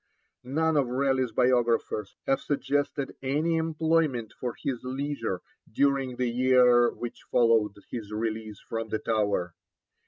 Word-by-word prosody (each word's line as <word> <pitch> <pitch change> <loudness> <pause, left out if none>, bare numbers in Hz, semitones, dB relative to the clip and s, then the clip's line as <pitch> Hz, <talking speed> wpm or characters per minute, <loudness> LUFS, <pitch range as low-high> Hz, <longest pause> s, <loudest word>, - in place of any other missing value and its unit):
None 155 +4 +1
of 140 -3 +2
Raleigh's 130 -1 +1
biographers 120 -4 +1
have 135 - +1
suggested 145 -1 -1
any 150 +5 +1
employment 160 -7 0
for 125 -2 -5
his 125 -4 -3
leisure 130 -7 -3 0.3
during 135 0 +1
the 125 0 0
year 125 0 +5
which 120 -1 -7
followed 115 -3 +3 0.2
his 110 -4 -6
release 110 -1 -3
from 115 -1 -5
the 110 - 0
Tower. 100 -6 0
125 Hz, 125 wpm, -27 LUFS, 115-140 Hz, 0.3 s, year